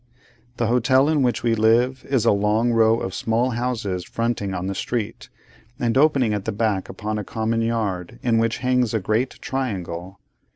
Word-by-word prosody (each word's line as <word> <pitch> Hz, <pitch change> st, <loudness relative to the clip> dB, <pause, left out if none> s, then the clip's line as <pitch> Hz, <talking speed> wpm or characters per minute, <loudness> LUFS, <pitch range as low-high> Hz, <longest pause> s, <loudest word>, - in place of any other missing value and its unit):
The 120 Hz, -, 0 dB
hotel 125 Hz, +4 st, +3 dB
in 155 Hz, -2 st, +2 dB
which 125 Hz, -2 st, 0 dB
we 115 Hz, -1 st, +2 dB
live, 115 Hz, +4 st, +2 dB
is 130 Hz, -5 st, +1 dB
a -, -, +5 dB
long 105 Hz, +4 st, +2 dB
row 115 Hz, 0 st, +4 dB
of 95 Hz, -, -4 dB
small 115 Hz, +3 st, 0 dB
houses 115 Hz, -7 st, -2 dB
fronting 115 Hz, -3 st, -2 dB
on 90 Hz, -1 st, -3 dB
the 100 Hz, -, -2 dB
street, 115 Hz, +2 st, -4 dB, 0.5 s
and 120 Hz, -1 st, 0 dB
opening 135 Hz, -5 st, +3 dB
at 105 Hz, -2 st, -3 dB
the 110 Hz, -, -1 dB
back 105 Hz, -2 st, -1 dB
upon 105 Hz, 0 st, -4 dB
a -, -, -4 dB
common 115 Hz, +3 st, -1 dB
yard, 110 Hz, -3 st, -2 dB
in 115 Hz, -2 st, +2 dB
which 115 Hz, 0 st, +1 dB
hangs 125 Hz, -3 st, +2 dB
a -, -, +2 dB
great 110 Hz, +6 st, -1 dB
triangle. 95 Hz, -8 st, -4 dB
115 Hz, 180 wpm, -22 LUFS, 105-120 Hz, 0.5 s, a